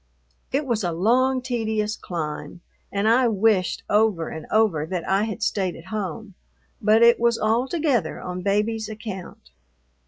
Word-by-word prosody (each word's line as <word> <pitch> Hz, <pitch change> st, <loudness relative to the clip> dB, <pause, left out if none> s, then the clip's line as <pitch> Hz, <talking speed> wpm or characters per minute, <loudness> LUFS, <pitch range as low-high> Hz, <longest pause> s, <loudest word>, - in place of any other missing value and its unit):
It 280 Hz, +3 st, 0 dB
was 235 Hz, -5 st, -1 dB
a 175 Hz, -, 0 dB
long, 250 Hz, +9 st, +2 dB
tedious 220 Hz, -4 st, -1 dB
climb, 165 Hz, 0 st, -6 dB, 0.3 s
and 200 Hz, +1 st, 0 dB
I 240 Hz, +3 st, +4 dB
wished 210 Hz, -4 st, +1 dB
over 205 Hz, -6 st, +2 dB
and 160 Hz, -1 st, -8 dB
over 215 Hz, -9 st, +2 dB
that 180 Hz, -1 st, -4 dB
I 195 Hz, +2 st, +2 dB
had 220 Hz, 0 st, -4 dB
stayed 190 Hz, -5 st, 0 dB
at 165 Hz, -, -12 dB
home; 205 Hz, 0 st, -4 dB, 0.5 s
but 220 Hz, +2 st, +4 dB
it 235 Hz, 0 st, +6 dB
was 235 Hz, 0 st, +2 dB
altogether 245 Hz, -, 0 dB
on 180 Hz, 0 st, -5 dB
Baby's 210 Hz, +3 st, 0 dB
account. 205 Hz, -, -8 dB
215 Hz, 150 wpm, -23 LUFS, 185-230 Hz, 0.5 s, it